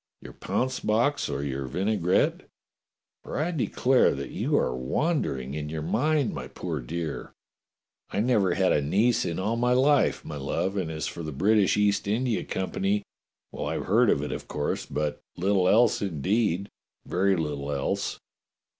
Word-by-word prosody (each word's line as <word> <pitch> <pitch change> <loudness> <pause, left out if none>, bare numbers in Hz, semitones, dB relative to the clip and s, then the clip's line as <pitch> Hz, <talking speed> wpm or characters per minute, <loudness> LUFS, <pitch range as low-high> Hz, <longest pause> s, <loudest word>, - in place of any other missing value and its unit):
Your - - -11
pounce 130 0 -2
box 120 +7 +1
or 70 - -2
your 70 -1 -3
vinai 95 - 0
grette? 90 +3 +1 0.7
for - - -6
I 155 +5 0
declare 130 - +2
that 70 0 -6
you - - 0
are 65 - +1
wandering 65 - -1
in 75 0 -4
your 80 0 -4
mind, 140 - +1
my 65 -2 -5
poor 80 +2 -4
dear. 80 +4 -5 0.7
I - - -2
never 105 -6 +2
had 95 -1 +3
a 75 - +3
niece 105 +11 +2
in 85 - -2
all 105 +5 0
my 125 +1 +2
life, 140 +3 +3
my 75 - -6
love, 70 +8 -2
and 90 -5 -1
as 80 -1 -3
for 85 - -5
the 80 -1 -5
British 100 +8 +3
East 105 -1 +2
India 115 +2 0
Company 95 +2 -1 0.2
— - - -62
well, - - -4
I - - -1
have - - -3
heard 115 +4 +4
of 70 - +2
it, 75 - -4
of - - -5
course, 75 -1 -2
but 75 -1 -2 0.2
little 95 0 +2
else 120 +3 +4
in 90 -7 -3
deed 100 +2 +1 0.2
— - - -54
very 95 +2 +2
little 75 -3 -3
else." 70 -1 -2
95 Hz, 180 wpm, -27 LUFS, 75-115 Hz, 0.7 s, heard